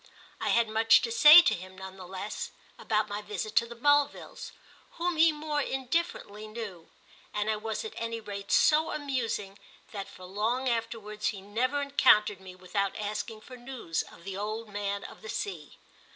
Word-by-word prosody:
I -, -, -1 dB
had 235 Hz, -1 st, +3 dB
much 225 Hz, +1 st, +5 dB
to 230 Hz, -, -1 dB
say 300 Hz, +9 st, +10 dB
to -, -, +3 dB
him, 185 Hz, +1 st, -8 dB
none 190 Hz, 0 st, -8 dB
the 185 Hz, -2 st, -10 dB
less, 190 Hz, +3 st, -5 dB, 0.3 s
about 215 Hz, -1 st, 0 dB
my 205 Hz, 0 st, -4 dB
visit 210 Hz, +1 st, -5 dB
to 235 Hz, -, +4 dB
the 235 Hz, -, -9 dB
Mulvilles, 290 Hz, +3 st, +1 dB, 0.4 s
whom 345 Hz, +1 st, -1 dB
he 325 Hz, +1 st, +6 dB
more 300 Hz, -1 st, -2 dB
indifferently 265 Hz, -6 st, -2 dB
knew, 215 Hz, -7 st, -8 dB, 0.5 s
and 210 Hz, +1 st, +1 dB
I 215 Hz, -, -1 dB
was 220 Hz, -, -4 dB
at 440 Hz, -, -6 dB
any 230 Hz, 0 st, -3 dB
rate 200 Hz, -2 st, -7 dB
so 315 Hz, +1 st, +4 dB
amusing 235 Hz, -9 st, -3 dB, 0.3 s
that 200 Hz, -2 st, -5 dB
for 185 Hz, -, -12 dB
long 220 Hz, +7 st, -1 dB
afterwards 225 Hz, -3 st, -2 dB
he 200 Hz, -, -2 dB
never 255 Hz, +8 st, 0 dB
encountered 215 Hz, -8 st, +4 dB
me 185 Hz, -1 st, -11 dB
without 185 Hz, +2 st, -2 dB
asking 215 Hz, +1 st, -4 dB
for 255 Hz, -, -11 dB
news 240 Hz, -10 st, -3 dB
of 170 Hz, -, -16 dB
the 195 Hz, 0 st, -6 dB
old 215 Hz, +2 st, -4 dB
man 200 Hz, 0 st, -3 dB
of -, -, -11 dB
the 220 Hz, -, -9 dB
sea. 170 Hz, -10 st, -5 dB
215 Hz, 180 wpm, -29 LUFS, 200-255 Hz, 0.5 s, say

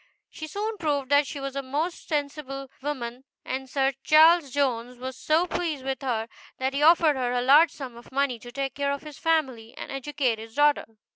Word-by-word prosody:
She 310 Hz, -, -7 dB
soon 420 Hz, +5 st, -4 dB
proved 285 Hz, -5 st, -1 dB
that 285 Hz, 0 st, +5 dB
she 285 Hz, -, -6 dB
was 275 Hz, 0 st, -5 dB
a 275 Hz, -, -1 dB
most 295 Hz, +6 st, -3 dB
sensible 280 Hz, -3 st, -4 dB
woman, 260 Hz, -3 st, -4 dB, 0.2 s
and 265 Hz, 0 st, -4 dB
Sir 270 Hz, 0 st, +1 dB
Charles 320 Hz, 0 st, +6 dB
Jones 250 Hz, -3 st, -1 dB
was 260 Hz, +1 st, -6 dB
so 315 Hz, +6 st, +2 dB
pleased 320 Hz, -7 st, -3 dB
with 270 Hz, +1 st, -3 dB
her, 230 Hz, -4 st, -1 dB, 0.3 s
that 265 Hz, +1 st, -1 dB
he 280 Hz, -, -1 dB
offered 320 Hz, -1 st, +5 dB
her 250 Hz, -2 st, -1 dB
a 245 Hz, -, +1 dB
large 295 Hz, +6 st, +7 dB
sum 265 Hz, -5 st, -8 dB
of 235 Hz, -, -14 dB
money 270 Hz, -3 st, 0 dB
to 240 Hz, +2 st, -11 dB
take 270 Hz, 0 st, -3 dB
care 280 Hz, 0 st, -1 dB
of 280 Hz, +1 st, -4 dB
his 300 Hz, -2 st, -10 dB
family, 260 Hz, -8 st, 0 dB
and -, -, -7 dB
educate 270 Hz, -4 st, -1 dB
his 225 Hz, 0 st, -11 dB
daughter. 295 Hz, 0 st, +3 dB
275 Hz, 205 wpm, -26 LUFS, 255-300 Hz, 0.3 s, large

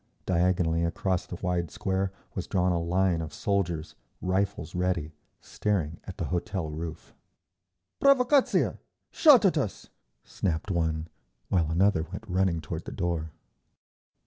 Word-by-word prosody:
Diagonally 85 Hz, -2 st, +2 dB
across 90 Hz, +2 st, -1 dB
the -, -, -6 dB
wide 90 Hz, -2 st, 0 dB
square 95 Hz, +4 st, -1 dB, 0.2 s
was 95 Hz, -, -4 dB
drawn 90 Hz, -1 st, +2 dB
a 85 Hz, -1 st, +1 dB
line 90 Hz, 0 st, +1 dB
of 80 Hz, -2 st, -5 dB
soldiers, 85 Hz, -4 st, -1 dB, 0.3 s
rifles 95 Hz, +3 st, -1 dB
ready, 90 Hz, -4 st, -1 dB, 0.3 s
staring 85 Hz, -7 st, -2 dB
at -, -, -8 dB
the -, -, -2 dB
hotel 90 Hz, -2 st, -2 dB
roof. 80 Hz, +1 st, -7 dB, 0.9 s
"Provacatzia! 275 Hz, 0 st, +4 dB, 0.3 s
Shot 285 Hz, -9 st, +7 dB
at 175 Hz, -5 st, +4 dB
us!" 120 Hz, -9 st, -4 dB, 0.3 s
snapped 90 Hz, +2 st, -2 dB
one, 80 Hz, -2 st, 0 dB, 0.4 s
while 85 Hz, -4 st, +2 dB
another 90 Hz, +1 st, +3 dB
went 90 Hz, +7 st, -7 dB
running 90 Hz, -3 st, +1 dB
toward 80 Hz, +1 st, -5 dB
the -, -, -6 dB
door. 85 Hz, -4 st, -2 dB
90 Hz, 130 wpm, -28 LUFS, 80-95 Hz, 0.9 s, Shot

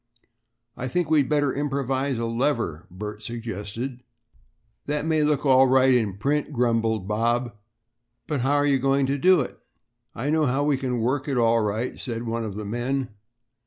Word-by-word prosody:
"I 130 Hz, -, -4 dB
think 160 Hz, +4 st, -1 dB
we'd 145 Hz, -4 st, +3 dB
better 145 Hz, -2 st, +2 dB
improvise 135 Hz, -2 st, -1 dB
a 115 Hz, -, -2 dB
lever," 115 Hz, -, -1 dB
Bert 105 Hz, +3 st, -7 dB
suggested. 115 Hz, +2 st, -5 dB, 0.9 s
"That 150 Hz, +1 st, -1 dB
may 160 Hz, -1 st, +2 dB
look 150 Hz, -1 st, +1 dB
all 130 Hz, -1 st, +6 dB
right 130 Hz, 0 st, +5 dB
in 110 Hz, -6 st, +1 dB
print," 145 Hz, +7 st, 0 dB
grumbled 115 Hz, -5 st, 0 dB
Bob, 120 Hz, +3 st, 0 dB, 0.7 s
"but 145 Hz, -2 st, -2 dB
how 135 Hz, +3 st, +2 dB
are 145 Hz, 0 st, +3 dB
you 140 Hz, -2 st, +3 dB
going 135 Hz, +1 st, +2 dB
to 140 Hz, +1 st, -1 dB
do 185 Hz, +2 st, +5 dB
it?" 125 Hz, -, -6 dB, 0.6 s
"I 140 Hz, +6 st, -2 dB
know 155 Hz, -1 st, +2 dB
how 135 Hz, +3 st, +1 dB
we 145 Hz, -1 st, +2 dB
can 125 Hz, -3 st, -2 dB
work 130 Hz, +5 st, 0 dB
it 135 Hz, -3 st, -1 dB
all 115 Hz, -1 st, +4 dB
right," 110 Hz, +4 st, -2 dB
said 115 Hz, -2 st, -4 dB
one 115 Hz, 0 st, -2 dB
of 105 Hz, -3 st, -5 dB
the 105 Hz, 0 st, -5 dB
men. 120 Hz, +4 st, -2 dB
130 Hz, 175 wpm, -24 LUFS, 115-140 Hz, 0.9 s, all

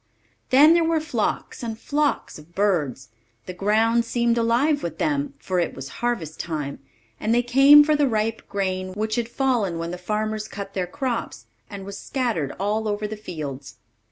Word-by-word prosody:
Then 295 Hz, +5 st, +7 dB
there 340 Hz, 0 st, +4 dB
were 325 Hz, 0 st, +2 dB
flocks 290 Hz, -9 st, -2 dB
and 225 Hz, -2 st, -4 dB
flocks 290 Hz, -, -1 dB
of 160 Hz, +3 st, -18 dB
birds; 155 Hz, -, 0 dB, 0.4 s
the 185 Hz, -, -6 dB
ground 220 Hz, +5 st, +2 dB
seemed 235 Hz, 0 st, +1 dB
alive 240 Hz, +6 st, +2 dB
with 165 Hz, -1 st, -5 dB
them, 145 Hz, -2 st, -1 dB
for 185 Hz, -1 st, -2 dB
it 170 Hz, -, -1 dB
was 135 Hz, 0 st, -7 dB
harvest 200 Hz, -11 st, -2 dB
time, 150 Hz, -4 st, -4 dB, 0.4 s
and 220 Hz, +2 st, +1 dB
they 240 Hz, -, +3 dB
came 275 Hz, +4 st, +8 dB
for 305 Hz, +1 st, +2 dB
the 290 Hz, -1 st, +3 dB
ripe 225 Hz, -1 st, -2 dB
grain 185 Hz, -2 st, -2 dB
which 215 Hz, +2 st, -2 dB
had 235 Hz, 0 st, -1 dB
fallen 240 Hz, -10 st, 0 dB
when 165 Hz, +1 st, -4 dB
the 180 Hz, -, -6 dB
farmers 215 Hz, +3 st, -2 dB
cut 200 Hz, -2 st, -7 dB
their 185 Hz, -2 st, -2 dB
crops, 255 Hz, +3 st, -4 dB, 0.2 s
and 200 Hz, -2 st, -8 dB
was 200 Hz, 0 st, -7 dB
scattered 230 Hz, -, -2 dB
all 210 Hz, +3 st, 0 dB
over 210 Hz, 0 st, -2 dB
the 215 Hz, -, -5 dB
fields. 150 Hz, -9 st, -7 dB
215 Hz, 180 wpm, -23 LUFS, 180-240 Hz, 0.4 s, came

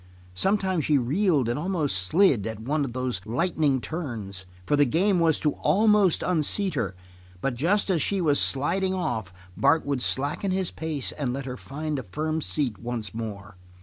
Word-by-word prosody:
Sometimes 190 Hz, -, +1 dB
she 150 Hz, -, +3 dB
reeled 145 Hz, -, +1 dB
and 120 Hz, +4 st, -1 dB
almost 165 Hz, -, 0 dB
slid 125 Hz, -, +3 dB
at 110 Hz, -2 st, -5 dB
one 145 Hz, +6 st, -1 dB
of 130 Hz, -4 st, -4 dB
those 125 Hz, -6 st, -2 dB
lightning 140 Hz, -, 0 dB
turns, 110 Hz, -, -5 dB, 0.2 s
for 145 Hz, -, +2 dB
the 145 Hz, -, +5 dB
game 180 Hz, -, +2 dB
was 165 Hz, -2 st, +3 dB
to 150 Hz, -, +1 dB
almost 205 Hz, +3 st, +3 dB
unseat 180 Hz, +3 st, +1 dB
her, 120 Hz, -9 st, -2 dB, 0.4 s
but 135 Hz, +7 st, -1 dB
just 185 Hz, -, +1 dB
as 170 Hz, -4 st, +1 dB
she 200 Hz, +5 st, 0 dB
was 150 Hz, -5 st, +3 dB
sliding 185 Hz, +8 st, +2 dB
off 110 Hz, -, -3 dB, 0.2 s
Bart 160 Hz, +2 st, +3 dB
would 140 Hz, -3 st, -1 dB
slacken 145 Hz, +10 st, 0 dB
his 185 Hz, -1 st, -1 dB
pace 155 Hz, -4 st, -3 dB
and 135 Hz, -5 st, -3 dB
let 135 Hz, 0 st, -4 dB
her 125 Hz, -2 st, -5 dB
find 150 Hz, +3 st, -4 dB
a -, -, -3 dB
firm 155 Hz, -, -3 dB
seat 135 Hz, -9 st, -1 dB
once 115 Hz, -5 st, -4 dB
more. 100 Hz, -4 st, -7 dB
145 Hz, 180 wpm, -26 LUFS, 120-175 Hz, 0.4 s, the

